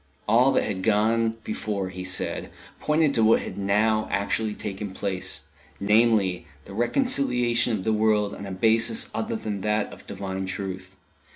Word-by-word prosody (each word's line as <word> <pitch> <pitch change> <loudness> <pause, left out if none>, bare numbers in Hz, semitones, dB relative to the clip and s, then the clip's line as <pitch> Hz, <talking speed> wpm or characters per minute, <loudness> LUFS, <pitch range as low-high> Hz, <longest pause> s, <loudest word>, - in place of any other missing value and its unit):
All 120 +5 +5
that - - +2
had 95 -2 -3
gone 110 +2 +2
before, 100 -3 -3
he 90 0 -7
said, 95 0 -2 0.3
pointed 150 -1 +2
to 115 - +2
what 110 +1 +5
had - - -6
now 105 +2 +1
actually 105 +2 -1
taken 100 -1 -5
place 95 -3 -2 0.4
namely, 105 -3 +2 0.2
the - - -10
reconciliation 125 - +1
of 95 - -6
the 110 - +1
world 105 -1 +2
on 100 - -7
a - - -6
basis 110 +3 +1
other 110 +1 -2
than 105 -3 -4
that 105 +1 0
of - - -14
Divine 95 -1 -4
Truth. 95 0 -5
105 Hz, 160 wpm, -25 LUFS, 100-115 Hz, 0.4 s, All